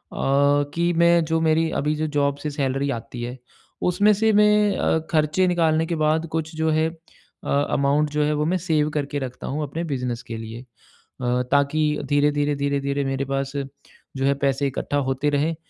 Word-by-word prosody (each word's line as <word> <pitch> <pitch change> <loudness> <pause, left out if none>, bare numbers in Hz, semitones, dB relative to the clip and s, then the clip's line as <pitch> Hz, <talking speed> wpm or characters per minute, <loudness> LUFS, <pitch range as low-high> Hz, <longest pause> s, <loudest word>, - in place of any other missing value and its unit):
कि 145 +4 +2
मैं 170 0 +5
जो 160 +1 0
मेरी 160 0 +2
अभी 150 +1 0
जो 155 +1 -2
जॉब 140 0 +1
से 150 - -1
सैलरी 140 -1 -1
आती 115 0 -6
है 125 +2 -5 0.5
उसमें 205 +4 +4
से 220 +2 +2
मैं 210 -1 +4
अ, 160 - +1
खर्चे 155 +4 +2
निकालने 165 -2 +2
के 170 +1 -2
बाद 155 +1 +1
कुछ 160 0 -3
जो 160 0 0
है 155 +1 +2
अ, 165 0 -15
अमाउंट 145 +1 +1
जो 150 0 +1
है 150 +1 +1
वो 150 +1 0
मैं 180 +4 +1
सेव 155 -4 0
करके 145 0 -3
रखता 130 -2 -6
हूँ 150 +3 -2
अपने 150 +4 -4
बिज़नेस 125 -6 -3
के 115 -1 -6
लिए। 115 +2 -7
अ, 125 0 -5
ताकि 140 +2 +2 0.3
धीरे-धीरे, 145 0 +2
धीरे-धीरे 140 0 -1
मेरे 135 0 -2
पास 135 0 -2 0.7
जो 135 - 0
है 140 - +4
पैसे 140 +1 +1
इकट्ठा 140 +2 -2
होते 135 +3 0
रहें 150 +3 0
145 Hz, 185 wpm, -23 LUFS, 140-160 Hz, 0.7 s, मैं